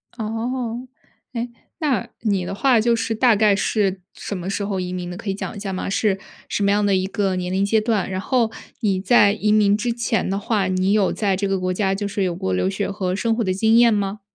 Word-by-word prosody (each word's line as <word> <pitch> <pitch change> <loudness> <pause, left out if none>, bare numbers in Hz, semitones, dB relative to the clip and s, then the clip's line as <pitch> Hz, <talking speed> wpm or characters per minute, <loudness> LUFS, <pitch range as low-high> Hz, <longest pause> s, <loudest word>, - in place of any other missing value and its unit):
哦， 235 +2 -3 0.5
哎， 240 0 -3 0.3
那 280 - 0
你 200 -5 0
的 195 - -4
话 250 +2 +3
就 235 +1 +3
是 225 0 -1
大 230 0 +4
概 210 -1 +4
是 195 -2 0
什 200 - -5
么 180 +1 -5
时 200 +1 -2
候 200 -2 -2
移 180 0 -3
民 180 -1 -4
的， 175 - -7
可 215 0 -6
以 - - +1
讲 - - -5
一 - - -7
下 195 -1 -4
吗？ 185 - -3
是 200 -1 +1 0.3
什 205 - -1
么 200 - +3
样 205 0 +2
的 200 - +3
一 185 0 +1
个 195 -1 -1
年 180 0 -3
龄 190 +1 +1
阶 220 +2 +3
段， 215 -4 0
然 185 0 -3
后 235 -1 +1 0.3
你 200 -4 +1
在 205 -1 +5
移 210 0 0
民 210 -1 +4
之 235 +3 -1
前 230 -3 -1
的 195 +1 -1
话， 205 -2 0
你 185 +1 +1
有 205 -3 +3
在 200 -3 0
这 200 +1 -1
个 195 -1 0
国 185 0 -1
家 195 0 0
就 200 +1 -2
是 200 0 -2
有 180 -2 -1
过 95 - -2
留 90 0 +1
学 - - -2
和 185 -2 -2
生 225 +2 0
活 235 - 0
的 185 -2 0
经 220 +4 +3
验 235 -1 +6
吗？ 205 0 -1
205 Hz, 270 characters per minute, -21 LUFS, 190-225 Hz, 0.5 s, 验